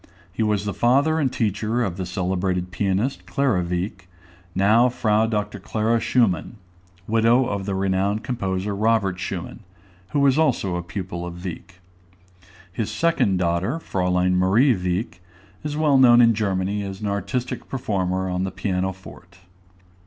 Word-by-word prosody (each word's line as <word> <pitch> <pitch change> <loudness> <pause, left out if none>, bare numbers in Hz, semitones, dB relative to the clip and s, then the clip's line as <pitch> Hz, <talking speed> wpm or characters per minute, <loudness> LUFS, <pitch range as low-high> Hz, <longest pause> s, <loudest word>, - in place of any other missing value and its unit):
He 105 - -3
was 105 -2 +1
the 100 - -2
father 140 - +2
and 135 -5 +1
teacher 110 +2 -1
of 95 -6 -2
the 95 -2 -4
celebrated 90 0 -2
pianist, 100 +8 -1
Clara 130 -10 +1
Wieck, 90 +2 -4 0.5
now 110 +6 +4
Fr. 110 -2 +1
Dr. 105 -2 -2
Clara 110 +4 0
Schumann, 115 -3 +1 0.5
widow 115 +4 +3
of 100 -3 -3
the 100 - -1
renowned 95 +2 0
composer 100 -4 -2
Robert 105 -3 +1
Schumann, 95 +2 -5 0.5
who 145 - 0
was 140 +1 +4
also 100 - +1
a 90 - -2
pupil 85 -1 -6
of 85 0 -7
Wieck. 90 +1 -8 0.9
His 110 0 -2
second 160 - +1
daughter, 85 - 0
Fräulein 90 - 0
Marie 95 +9 +4
Wieck, 90 0 -3 0.4
is 150 0 -3
well 150 -3 +4
known 120 -2 +7
in 115 -1 +6
Germany 100 -1 -1
as 95 0 -6
an 105 - -2
artistic 100 +5 -3
performer 95 -7 -1
on 90 0 -1
the 95 - -1
piano 95 0 -2
forte. 95 0 -15
100 Hz, 150 wpm, -23 LUFS, 95-115 Hz, 0.9 s, known